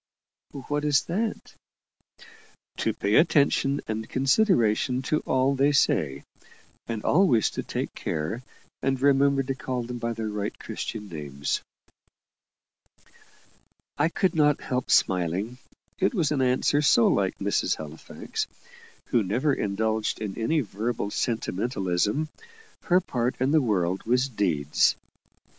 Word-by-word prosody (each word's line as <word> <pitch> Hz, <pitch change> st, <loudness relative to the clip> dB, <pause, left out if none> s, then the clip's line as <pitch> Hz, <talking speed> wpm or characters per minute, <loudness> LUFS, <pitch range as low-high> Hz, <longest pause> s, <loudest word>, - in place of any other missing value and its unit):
"What 145 Hz, 0 st, -1 dB
is 145 Hz, -2 st, +3 dB
that?" 215 Hz, +6 st, -3 dB, 1.2 s
"To -, -, 0 dB
pay 100 Hz, -, -2 dB
attention 145 Hz, -3 st, +3 dB
and 110 Hz, 0 st, -4 dB
consideration 130 Hz, -, +2 dB
to 155 Hz, +4 st, +1 dB
all 130 Hz, +1 st, +2 dB
they 140 Hz, +2 st, +3 dB
say; 70 Hz, -, +1 dB, 0.6 s
and 115 Hz, -2 st, -4 dB
always 145 Hz, -, +3 dB
to -, -, -3 dB
take -, -, -4 dB
care 80 Hz, +10 st, -3 dB, 0.4 s
and 135 Hz, 0 st, 0 dB
remember 140 Hz, 0 st, +3 dB
to 135 Hz, +1 st, -2 dB
call 130 Hz, -1 st, -4 dB
them 120 Hz, +1 st, -6 dB
by 115 Hz, 0 st, -2 dB
their 110 Hz, -1 st, -4 dB
right 105 Hz, -1 st, -4 dB
Christian 105 Hz, -2 st, -6 dB
names." 70 Hz, -5 st, -3 dB, 2.3 s
I 150 Hz, +3 st, +2 dB
could 180 Hz, +1 st, 0 dB
not 150 Hz, -3 st, +3 dB
help 125 Hz, 0 st, -3 dB
smiling 95 Hz, +7 st, +1 dB, 0.4 s
it 195 Hz, +6 st, +1 dB
was 160 Hz, -7 st, +1 dB
an 140 Hz, -3 st, +1 dB
answer 130 Hz, +3 st, +2 dB
so 120 Hz, -5 st, +5 dB
like 95 Hz, -2 st, +1 dB
Mrs. 100 Hz, +1 st, 0 dB
Halifax, 80 Hz, 0 st, -6 dB, 0.6 s
who 120 Hz, -, +3 dB
never 120 Hz, +9 st, +1 dB
indulged 110 Hz, 0 st, -1 dB
in 105 Hz, -3 st, -4 dB
any 150 Hz, +8 st, +1 dB
verbal 110 Hz, -1 st, -3 dB
sentimentalism. 105 Hz, -, -1 dB, 0.6 s
Her 180 Hz, +1 st, +4 dB
part 125 Hz, -8 st, -1 dB
in 130 Hz, +2 st, +1 dB
the 155 Hz, 0 st, +4 dB
world 95 Hz, -6 st, 0 dB
was 125 Hz, +2 st, +2 dB
deeds. 80 Hz, -, +1 dB
120 Hz, 125 wpm, -26 LUFS, 105-140 Hz, 2.3 s, so